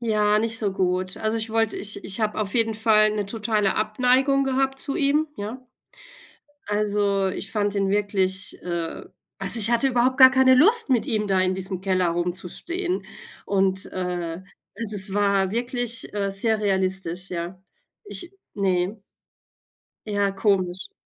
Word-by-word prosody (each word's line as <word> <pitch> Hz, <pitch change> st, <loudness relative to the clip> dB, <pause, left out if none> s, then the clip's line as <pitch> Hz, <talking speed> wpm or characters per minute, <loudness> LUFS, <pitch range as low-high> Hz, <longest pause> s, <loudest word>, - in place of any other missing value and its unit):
Ja, 210 Hz, -2 st, +2 dB
nicht 225 Hz, +1 st, -1 dB
so 205 Hz, -3 st, -1 dB
gut. 185 Hz, 0 st, -1 dB
Also 220 Hz, +1 st, -1 dB
ich 225 Hz, 0 st, -3 dB
wollte 225 Hz, -1 st, 0 dB
ich 205 Hz, 0 st, -6 dB
ich 200 Hz, +3 st, -5 dB
habe 215 Hz, 0 st, -1 dB
auf 205 Hz, +1 st, -3 dB
jeden 225 Hz, -2 st, +1 dB
Fall 215 Hz, -1 st, +3 dB
'ne 205 Hz, -2 st, -2 dB
totale 215 Hz, -2 st, -1 dB
Abneigung 255 Hz, +6 st, +2 dB
gehabt 270 Hz, 0 st, 0 dB
zu 280 Hz, -, -2 dB
ihm, 295 Hz, +2 st, +1 dB
ja. 230 Hz, +5 st, -7 dB, 1.0 s
Also, 205 Hz, -2 st, 0 dB
ich 200 Hz, +1 st, -5 dB
fand 205 Hz, -1 st, -1 dB
ihn 195 Hz, -1 st, 0 dB
wirklich, 195 Hz, -2 st, -1 dB
äh 170 Hz, -2 st, -4 dB, 0.3 s
also 195 Hz, +4 st, +5 dB
ich 225 Hz, +2 st, +4 dB
hatte 240 Hz, +3 st, +2 dB
überhaupt 255 Hz, +1 st, +1 dB
gar 260 Hz, 0 st, +10 dB
keine 260 Hz, -1 st, +5 dB
Lust, 430 Hz, -, +5 dB
mit 240 Hz, -4 st, +2 dB
ihm 215 Hz, -3 st, -1 dB
da 190 Hz, -1 st, +1 dB
in 185 Hz, 0 st, 0 dB
diesem 190 Hz, -1 st, -4 dB
Keller 185 Hz, -2 st, +1 dB
rumzustehen 185 Hz, -, -3 dB, 0.4 s
und 190 Hz, -1 st, 0 dB
äh, 180 Hz, -2 st, -4 dB, 0.4 s
also 215 Hz, -2 st, -2 dB
es 190 Hz, 0 st, +6 dB
war 200 Hz, -2 st, +1 dB
wirklich, 240 Hz, 0 st, -3 dB
äh, 200 Hz, -1 st, -1 dB
sehr 215 Hz, +2 st, 0 dB
realistisch, 190 Hz, -2 st, -1 dB
ja. 175 Hz, +1 st, -6 dB, 0.4 s
Ich 370 Hz, -2 st, -7 dB, 0.2 s
ne. 195 Hz, +1 st, -1 dB, 1.1 s
Ja, 205 Hz, -1 st, 0 dB
komisch. 195 Hz, -, -1 dB
205 Hz, 155 wpm, -23 LUFS, 190-230 Hz, 1.1 s, gar